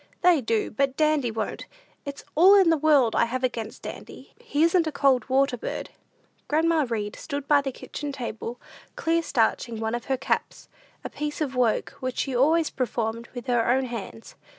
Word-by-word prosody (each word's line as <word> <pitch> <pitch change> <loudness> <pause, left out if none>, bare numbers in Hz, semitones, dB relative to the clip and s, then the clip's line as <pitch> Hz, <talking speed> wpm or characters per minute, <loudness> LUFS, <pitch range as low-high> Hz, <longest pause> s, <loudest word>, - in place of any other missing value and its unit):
"They 350 -5 +5
do, 225 -2 -1
but 270 +3 0
Dandy 305 -5 +2
won't; 220 -1 -4 0.4
it's 280 0 -7
all 370 +6 +7
in 380 -4 +5
the 325 - +3
world 285 -6 +3
I - - +4
have 255 +2 -4
against 230 -3 -3
Dandy; - - -9
he 390 -11 0
isn't 335 0 +3
a - - -1
cold 275 -3 +2
water 265 -1 +2
bird." - - -5 0.6
Grandma 315 -1 +2
Read 210 -3 -3
stood 285 -2 -5
by 290 -1 +5
the 275 -1 -3
kitchen 290 +3 -6
table, 240 -2 -6 0.4
clear 330 +1 +1
starching 235 -5 0
one 220 0 -2
of 240 -1 -3
her 265 -1 0
caps - - -3 0.3
a - - -5
piece 295 0 -4
of 280 -4 -2
work 240 -3 +1
which 255 -1 -4
she 270 -3 -1
always 310 +5 +3
performed 230 -2 -3
with 245 - -6
her 240 -2 +1
own 260 +2 +2
hands. 230 -2 -7
265 Hz, 185 wpm, -25 LUFS, 235-305 Hz, 0.6 s, all